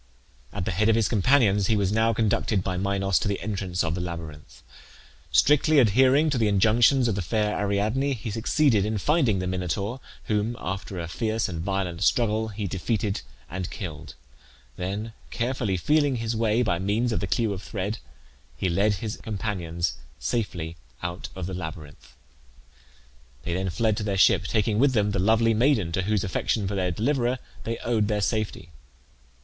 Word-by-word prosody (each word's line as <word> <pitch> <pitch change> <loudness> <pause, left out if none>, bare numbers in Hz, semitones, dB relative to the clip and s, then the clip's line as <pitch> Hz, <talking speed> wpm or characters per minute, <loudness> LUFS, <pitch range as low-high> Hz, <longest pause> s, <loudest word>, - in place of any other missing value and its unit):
At 90 - -4
the - - -1
head 105 +5 +2
of 110 - +5
his 115 -2 +2
companions 105 -3 +3
he 110 - +3
was 100 -1 +1
now 110 +1 +3
conducted 110 -3 +1
by 95 -1 -2
Minos 100 0 +1
to - - -2
the 100 -1 -1
entrance 95 -2 -2
of 80 -1 -1
the 90 - -3
labyrinth. 85 -4 -7 0.7
Strictly 150 +2 +4
adhering 130 +5 +5
to 130 - 0
the 110 - +3
injunctions 115 +6 +4
of 115 - +1
the 100 - -2
fair 105 +3 0
Ariadne 105 +7 0
he 110 -1 -5
succeeded 115 0 +2
in 110 +1 -1
finding 130 - +2
the 90 - -2
Minotaur, 95 +6 -2 0.2
whom, 110 +2 -1
after 95 +1 -5
a 85 - -4
fierce 110 +5 -1
and 85 -3 -4
violent 95 -2 -2
struggle, 110 +3 +2
he 105 -1 -5
defeated 100 +2 -1 0.3
and 90 0 -4
killed; 80 -7 -7 0.6
then 100 +5 -4 0.2
carefully 120 -5 -1
feeling 145 - +2
his 115 -1 -2
way, 115 +1 +2
by 85 -7 0
means 105 +6 0
of - - 0
the 100 - -3
clue 110 +1 +1
of 95 - -6
thread, 105 +1 -4 0.6
he 95 - 0
led 100 +5 +2
his 105 +3 -5
companions 90 -6 -3 0.2
safely 85 - -3 0.3
out 85 +1 -4
of 95 -2 -4
the 95 - -5
labyrinth. 80 -4 -8 1.3
They 85 - -3
then 95 +1 -1
fled 110 +5 +1
to - - -2
their 100 -2 -1
ship, 95 - +4
taking 105 0 +1
with 135 +1 +4
them 105 -3 +2
the 100 - -1
lovely 110 +3 +3
maiden 110 - +2
to 95 - 0
whose 105 0 0
affection 95 +2 -1
for 100 - -3
their 95 -2 0
deliverer 120 - 0 0.3
they 115 0 -2
owed 110 -3 +1
their 105 -1 0
safety. 105 -6 -2
105 Hz, 175 wpm, -26 LUFS, 95-115 Hz, 1.3 s, of